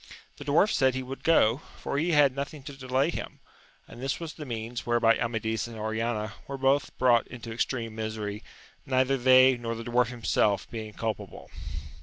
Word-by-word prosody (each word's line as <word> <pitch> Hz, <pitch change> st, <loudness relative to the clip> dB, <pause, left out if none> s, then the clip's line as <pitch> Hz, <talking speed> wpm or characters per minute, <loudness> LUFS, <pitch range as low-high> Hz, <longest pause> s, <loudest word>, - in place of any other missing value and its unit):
The 145 Hz, -, -9 dB
dwarf 155 Hz, +8 st, +4 dB
said 130 Hz, -2 st, +3 dB
he 130 Hz, -, -2 dB
would 135 Hz, +1 st, -8 dB
go, 125 Hz, -8 st, +4 dB, 0.2 s
for 140 Hz, -, -2 dB
he 165 Hz, +4 st, 0 dB
had 145 Hz, -3 st, +5 dB
nothing 140 Hz, +1 st, -5 dB
to 145 Hz, +1 st, -8 dB
delay 135 Hz, +3 st, 0 dB
him; -, -, -6 dB, 0.5 s
and 120 Hz, -, -11 dB
this 135 Hz, +1 st, -2 dB
was 165 Hz, -2 st, -6 dB
the 150 Hz, -3 st, -8 dB
means 115 Hz, 0 st, -4 dB
whereby 120 Hz, -1 st, +3 dB
Amadis 110 Hz, -1 st, -2 dB
and 115 Hz, -1 st, -9 dB
Oriana 110 Hz, 0 st, -2 dB
were 140 Hz, -, -5 dB
both 135 Hz, +2 st, +2 dB
brought 120 Hz, -2 st, +4 dB
into 115 Hz, -2 st, -8 dB
extreme 115 Hz, -1 st, -2 dB
misery, 110 Hz, -1 st, -4 dB, 0.4 s
neither 130 Hz, 0 st, +2 dB
they 130 Hz, 0 st, +6 dB
nor 115 Hz, -1 st, -4 dB
the 115 Hz, -, -6 dB
dwarf 120 Hz, 0 st, +2 dB
himself 110 Hz, -4 st, +1 dB
being 110 Hz, -2 st, -6 dB
culpable. 110 Hz, -2 st, -5 dB
120 Hz, 180 wpm, -28 LUFS, 115-135 Hz, 0.5 s, they